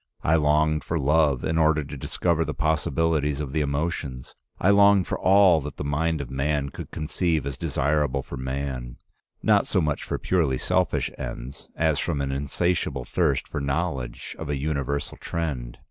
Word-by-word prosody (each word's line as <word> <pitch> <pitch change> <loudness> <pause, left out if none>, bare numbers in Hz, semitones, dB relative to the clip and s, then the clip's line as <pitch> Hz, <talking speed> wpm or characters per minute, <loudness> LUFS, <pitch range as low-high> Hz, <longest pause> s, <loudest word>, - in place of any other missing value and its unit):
I 80 - +3
longed 75 -1 +2
for 80 - -2
love 75 -2 +2
in 80 +1 0
order 80 -1 +3
to 70 +1 -8
discover 85 +4 0
the 75 -1 -4
possibilities 80 -1 +1
of 70 -3 -4
the 80 - +1
emotions. 70 -3 -3 0.3
I 95 - +4
longed 100 -2 +6
for - - -3
all 95 -4 +5
that 75 +1 -7
the - - -4
mind 75 +2 0
of 65 - -7
man 70 +1 0
could - - -8
conceive 80 -1 -1
as 70 -1 -3
desirable 70 -1 0
for 70 - -8
man, 65 -2 -4 0.5
not - - +4
so - - +2
much 75 -2 0
for - - -3
purely 80 -8 +1
selfish - - 0
ends, 65 +4 -7
as 80 -2 +1
from 80 -5 -1
an 70 -1 -1
insatiable 70 -1 -1
thirst - - 0
for - - -4
knowledge 70 -4 -3
of 80 - -5
a 75 - 0
universal 70 0 -2
trend. 65 -8 -4
75 Hz, 175 wpm, -25 LUFS, 70-80 Hz, 0.5 s, longed